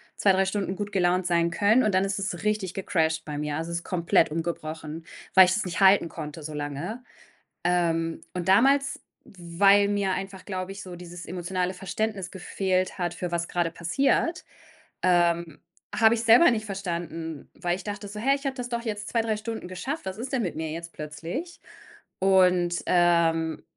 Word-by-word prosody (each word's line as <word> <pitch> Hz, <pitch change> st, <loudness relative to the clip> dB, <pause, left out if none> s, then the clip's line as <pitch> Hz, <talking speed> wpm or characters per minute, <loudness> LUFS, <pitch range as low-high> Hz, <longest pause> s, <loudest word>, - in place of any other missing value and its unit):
2, 200 Hz, -, +4 dB
3 190 Hz, 0 st, +3 dB
Stunden 195 Hz, 0 st, -2 dB
gut 205 Hz, +1 st, -4 dB
gelaunt 180 Hz, -1 st, +2 dB
sein 170 Hz, -1 st, +2 dB
können 210 Hz, +7 st, +4 dB
und 215 Hz, -, +1 dB
dann 185 Hz, +1 st, +3 dB
ist 195 Hz, 0 st, -2 dB
es 195 Hz, -1 st, -4 dB
richtig 210 Hz, -3 st, -1 dB
gecrasht 160 Hz, -4 st, 0 dB
bei 150 Hz, -1 st, -5 dB
mir. 150 Hz, 0 st, -2 dB
Also, 165 Hz, +1 st, -4 dB
es 170 Hz, -, -1 dB
ist -, -, -16 dB
komplett 170 Hz, -3 st, +2 dB
umgebrochen, 160 Hz, -1 st, -4 dB, 0.3 s
weil 190 Hz, -1 st, +9 dB
ich 180 Hz, -, +1 dB
das 215 Hz, +2 st, -1 dB
nicht 175 Hz, -2 st, -4 dB
halten 195 Hz, -2 st, +6 dB
konnte 150 Hz, 0 st, -8 dB
so 155 Hz, +1 st, -6 dB
lange. 150 Hz, -, -5 dB, 0.6 s
Ähm, 165 Hz, -2 st, +1 dB
und 180 Hz, -2 st, -4 dB
damals, 275 Hz, +7 st, +4 dB, 0.3 s
weil 195 Hz, +3 st, +3 dB
mir 200 Hz, -2 st, 0 dB
einfach, 195 Hz, 0 st, -5 dB
glaube 185 Hz, -1 st, -4 dB
ich, 195 Hz, 0 st, -8 dB
so 185 Hz, -2 st, -8 dB
dieses 175 Hz, 0 st, -9 dB
emotionale 180 Hz, +1 st, -2 dB
Verständnis 195 Hz, +1 st, -3 dB
gefehlt 185 Hz, -1 st, -1 dB
hat, 175 Hz, -2 st, -2 dB
für 175 Hz, 0 st, -5 dB
was 170 Hz, 0 st, -1 dB
grade 175 Hz, -2 st, -1 dB
passiert, 270 Hz, -, 0 dB, 0.6 s
ähm, 170 Hz, -2 st, +2 dB, 0.3 s
habe 220 Hz, +2 st, +5 dB
ich's 230 Hz, 0 st, -2 dB
selber 240 Hz, +8 st, +7 dB
nicht 220 Hz, -2 st, -1 dB
verstanden, 170 Hz, -5 st, -5 dB
weil 175 Hz, -2 st, -1 dB
ich 185 Hz, -, -9 dB
dachte 205 Hz, 0 st, -5 dB
so: 205 Hz, +2 st, -9 dB
„Hä, 270 Hz, +5 st, +3 dB
ich 280 Hz, +1 st, -9 dB
habe 270 Hz, -1 st, -1 dB
das 250 Hz, -2 st, -5 dB
doch 235 Hz, -1 st, -2 dB
jetzt 210 Hz, -2 st, -4 dB
2, 235 Hz, -, +1 dB
3 225 Hz, -1 st, -1 dB
Stunden 220 Hz, -2 st, -5 dB
geschafft. 250 Hz, -, -5 dB
Was 190 Hz, 0 st, -5 dB
ist 245 Hz, +4 st, -6 dB
denn 265 Hz, -3 st, 0 dB
mit 180 Hz, -, -3 dB
mir 160 Hz, 0 st, -3 dB
jetzt 170 Hz, +1 st, -7 dB
plötzlich?“ 165 Hz, -, -6 dB, 0.6 s
Und, 180 Hz, -2 st, +3 dB
ähm, 165 Hz, -2 st, +2 dB
185 Hz, 190 wpm, -26 LUFS, 170-205 Hz, 0.6 s, weil